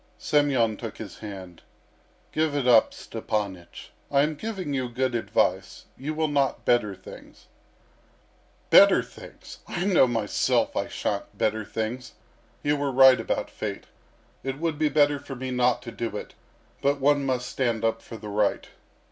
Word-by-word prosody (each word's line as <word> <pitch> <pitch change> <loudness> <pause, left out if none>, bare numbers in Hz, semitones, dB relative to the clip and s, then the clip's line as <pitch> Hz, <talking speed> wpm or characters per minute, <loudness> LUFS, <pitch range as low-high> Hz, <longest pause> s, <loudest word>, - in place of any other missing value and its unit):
Semyon 130 -7 +2
took 115 -3 -7
his 100 -5 -9
hand. 95 -5 -9 0.7
"Give 155 -2 0
it 140 -3 0
up, 115 -3 +6
Stepanych. 105 -5 -5 0.2
I 140 0 +3
am 155 +1 0
giving 185 -2 -5
you 130 -2 -1
good 130 +1 -1
advice. 115 - -1
You 150 +4 -5
will 160 0 +1
not 140 -2 0
better 105 -5 +2
things..." - - -14 1.3
"Better - - +7
things! - - -13
I 175 - -3
know 185 -9 +5
myself 115 -4 0
I - - -1
shan't - - -4
better 110 0 0
things. 115 +4 -5 0.5
You 145 0 +1
were 140 -1 -1
right 130 0 +7
about - - -2
Fate. - - -5 0.6
It 135 0 -3
would 160 -1 -2
be 155 -1 +2
better 145 0 +3
for 135 - -8
me 130 +1 -5
not 125 -1 +1
to 115 - -7
do 115 -3 -4
it, - - -8 0.5
but 140 +1 +1
one 145 +1 +3
must 130 -2 -1
stand 115 -4 -1
up 115 0 0
for 115 - -10
the 105 -1 -8
right." 105 0 0
130 Hz, 160 wpm, -26 LUFS, 110-145 Hz, 1.3 s, Better